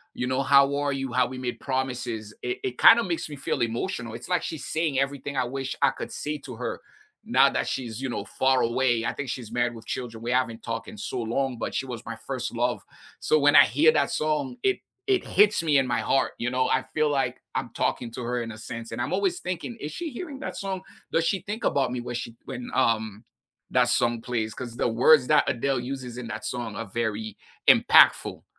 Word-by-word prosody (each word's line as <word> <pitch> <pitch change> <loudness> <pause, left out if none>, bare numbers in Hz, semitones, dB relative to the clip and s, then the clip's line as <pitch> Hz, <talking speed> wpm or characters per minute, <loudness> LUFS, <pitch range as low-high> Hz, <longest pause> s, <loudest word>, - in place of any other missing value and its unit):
You 125 - -2
know, 130 +1 0
"How 140 0 +5
are 145 0 0
you, 135 -3 -3
how 125 0 +3
we 130 - -7
made 125 -1 -4
promises," 125 -5 -3
it 125 0 -3
it 125 -1 -3
kinda 235 +1 +8
makes 170 -5 -3
me 150 - -6
feel 135 -1 -2
emotional. 115 - -2
It's, - - -8
like, 180 -1 +2
she's 160 - -5
saying 160 -4 0
everything 140 0 -2
I 130 - +3
wish 135 +1 -4
I - - +5
could - - -7
say 150 0 -3
to 135 -3 -9
her 125 +2 -4 0.4
now - - +5
that - - -1
she's, 120 -2 -4
you 135 - -2
know, - - -4
far 130 0 +2
away. 120 -1 +1
I - - -1
think 140 -2 -5
she's 120 -4 -5
married 120 0 0
with 115 -1 -11
children. 115 -2 -5
We 120 - -2
haven't 125 -3 0
talked 115 -1 -4
in 220 - -10
so 205 - -3
long, 125 +3 -1
but - - -3
she 135 - -1
was 120 -3 -7
my 115 - -5
1st 130 -2 -3
love. 120 +1 0 0.4
So, 155 - +3
when 145 +1 +4
I 145 - +10
hear 145 +8 +4
that - - +1
song, 150 -4 -1
it 390 -1 +2 0.3
it 390 -2 +2
hits 210 0 +4
me 150 -3 +3
in 130 - 0
my 120 - 0
heart, 135 - +1
you 120 - -1
know, 130 0 +1
I - - +2
feel 155 -1 +2
like 140 -2 -1
I'm - - -2
talking 120 -2 -1
to 125 - -6
her 120 +1 -1
in 115 - -6
a 110 - -9
sense, 115 +1 -7
and - - -3
I'm - - -2
always 190 -2 +1
thinking, 185 +6 -4
"Is 150 - -5
she 335 -3 -5
hearing 280 +1 -7
that - - -5
song? 190 -1 -4 0.3
Does 165 - +2
she 190 +2 0
think 215 +2 -5
about 135 -3 +1
me 125 - -3
when 120 0 -6
she 120 -1 -5
when, 125 0 -6
um, 110 -1 0 0.5
that - - +3
song 120 -1 +2
plays?" 115 -3 -2
'Cause 120 0 -7
the - - +1
words 125 +4 +5
that 150 -1 +4
Adele 135 0 0
uses 125 -1 -6
in 120 - -6
that 110 -1 -5
song 120 -4 -4
are 115 - -4
very 110 0 -3 0.3
impactful, - - +6
130 Hz, 235 wpm, -26 LUFS, 120-145 Hz, 0.5 s, I